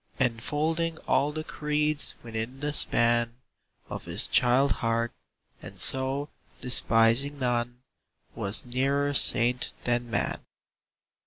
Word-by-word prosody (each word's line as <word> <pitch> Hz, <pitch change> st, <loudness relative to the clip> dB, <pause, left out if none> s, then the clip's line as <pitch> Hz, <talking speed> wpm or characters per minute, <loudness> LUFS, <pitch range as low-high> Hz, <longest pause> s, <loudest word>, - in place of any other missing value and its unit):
Enfolding 150 Hz, +7 st, -1 dB
all 145 Hz, +2 st, +2 dB
the 155 Hz, +1 st, -5 dB
creeds 150 Hz, -1 st, 0 dB
within 115 Hz, +3 st, -5 dB
the 145 Hz, +1 st, -2 dB
span 120 Hz, -3 st, +2 dB, 0.5 s
Of -, -, -7 dB
his -, -, 0 dB
child 130 Hz, +3 st, +3 dB
heart; 115 Hz, 0 st, -1 dB, 0.5 s
and -, -, -11 dB
so, 135 Hz, +2 st, +1 dB, 0.3 s
despising 120 Hz, +3 st, +3 dB
none, 120 Hz, -1 st, -2 dB, 0.5 s
Was 100 Hz, +4 st, -1 dB
nearer 140 Hz, +3 st, 0 dB
saint 125 Hz, -2 st, +2 dB
than 120 Hz, 0 st, -1 dB
man. 115 Hz, -, -1 dB
125 Hz, 105 wpm, -27 LUFS, 120-145 Hz, 0.5 s, child